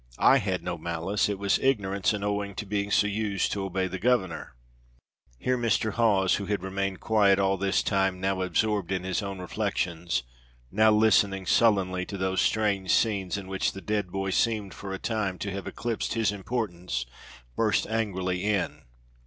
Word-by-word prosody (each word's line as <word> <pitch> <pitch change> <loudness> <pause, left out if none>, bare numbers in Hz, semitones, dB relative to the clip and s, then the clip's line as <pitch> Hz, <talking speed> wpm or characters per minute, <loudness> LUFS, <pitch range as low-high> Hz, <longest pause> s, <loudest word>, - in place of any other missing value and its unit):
I 135 - +6
had 95 -4 -2
no 90 -1 -4
malice; 85 +6 -1
it 100 - -2
was 100 0 +1
ignorance, 100 -7 +1
and 105 -2 -3
owing 100 -1 -2
to - - -4
being 100 0 -2
so 105 - +3
used 105 -2 -1
to 100 - -2
obey 95 0 -1
the 95 0 -4
governor." 110 - 0 0.8
Here 125 - 0
Mr. 110 -2 +1
Hawes, 100 -5 +3
who 100 - -5
had 100 -3 -1
remained 95 0 -2
quiet 100 -3 +3
all 95 0 +2
this 95 0 +1
time, 95 -2 +1
now 95 0 0
absorbed 100 0 0
in 95 -1 -1
his 95 +2 -1
own 100 -1 -5
reflections, 85 -5 -2 0.5
now 110 +3 +5
listening 105 -3 +3
sullenly 95 -4 +3
to 100 - -5
these 95 0 0
strange 100 -4 +1
scenes 100 -2 +1
in 100 -2 -7
which 95 0 -1
the 95 - -7
dead 105 -3 -2
boy 95 0 -2
seemed 105 -2 0
for 100 - -7
a 95 - -3
time 100 -4 -2
to 100 - -4
have 100 0 -5
eclipsed 115 0 -3
his 110 -3 +2
importance, 90 - -3 0.5
burst 110 -2 +2
angrily 95 -5 -2
in. 100 -8 -1
100 Hz, 175 wpm, -27 LUFS, 95-105 Hz, 0.8 s, I